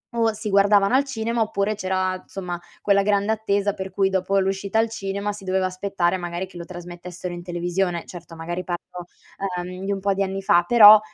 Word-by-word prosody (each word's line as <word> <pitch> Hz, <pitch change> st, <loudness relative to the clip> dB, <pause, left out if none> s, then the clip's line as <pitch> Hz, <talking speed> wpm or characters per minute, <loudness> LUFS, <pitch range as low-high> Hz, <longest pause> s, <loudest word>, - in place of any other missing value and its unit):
o 225 Hz, -1 st, +3 dB
si 215 Hz, 0 st, -5 dB
guardavano 200 Hz, +2 st, +4 dB
al 275 Hz, +2 st, +4 dB
cinema, 230 Hz, -3 st, -2 dB
oppure 210 Hz, -1 st, 0 dB
c'era 185 Hz, -2 st, -1 dB
insomma 180 Hz, -2 st, -6 dB, 0.2 s
quella 200 Hz, -1 st, +4 dB
grande 200 Hz, +1 st, +1 dB
attesa 205 Hz, -2 st, 0 dB
per 190 Hz, -1 st, -6 dB
cui 190 Hz, +1 st, +1 dB
dopo 190 Hz, +1 st, 0 dB
l'uscita 195 Hz, +2 st, 0 dB
al 225 Hz, +1 st, +4 dB
cinema 200 Hz, -1 st, -3 dB
si 205 Hz, -1 st, -10 dB
doveva 185 Hz, 0 st, 0 dB
aspettare, 185 Hz, -1 st, 0 dB
magari, 175 Hz, +1 st, -4 dB
che 185 Hz, -, -19 dB
lo 170 Hz, -, -7 dB
trasmettessero 175 Hz, 0 st, -8 dB
in 175 Hz, -, -6 dB
televisione. 175 Hz, 0 st, -2 dB
Certo, 175 Hz, -1 st, -10 dB
magari 175 Hz, +2 st, -4 dB
parlo, 175 Hz, 0 st, -6 dB, 0.6 s
uhm, 185 Hz, +1 st, -7 dB
di 200 Hz, -, -1 dB
un 195 Hz, -, -1 dB
po' 200 Hz, +1 st, +1 dB
di 195 Hz, -, -2 dB
anni 195 Hz, 0 st, -2 dB
fa, 175 Hz, -2 st, +4 dB
però, 215 Hz, -3 st, +10 dB
195 Hz, 200 wpm, -23 LUFS, 180-205 Hz, 0.6 s, però